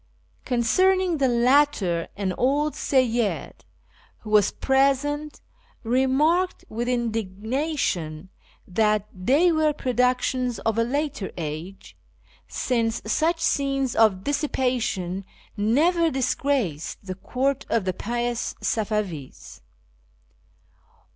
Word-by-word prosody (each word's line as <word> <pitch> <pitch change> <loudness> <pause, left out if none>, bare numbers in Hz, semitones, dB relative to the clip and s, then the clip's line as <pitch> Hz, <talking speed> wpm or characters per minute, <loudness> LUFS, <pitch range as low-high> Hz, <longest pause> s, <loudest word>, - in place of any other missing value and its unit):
Concerning 350 +9 +2
the 270 - +3
latter, 240 - +2
an 195 -2 -1
old 285 +7 +1
Seyyid, 240 -5 0 0.7
who 215 - -8
was 210 -2 +4
present, 280 +2 0 0.4
remarked 270 +9 +1
with 235 +2 -3
indigna 235 +5 -2
tion 160 - -2 0.4
that 210 +2 +1
they 275 - +3
were 310 -2 +2
productions 250 -1 0
of 225 0 0
a - - +4
later 275 -3 -2
age, 165 +4 -6 0.5
since 230 -2 -1
such 325 +9 +1
scenes 275 -5 0
of 210 -4 +3
dissipation 250 - -1 0.3
never 320 - +2
disgraced 260 - -1
the 185 - -4
court 265 +8 -2
of 225 -5 +1
the 185 - 0
pious 240 +3 -3
Safavis. 205 - -3
245 Hz, 95 wpm, -24 LUFS, 210-280 Hz, 0.7 s, was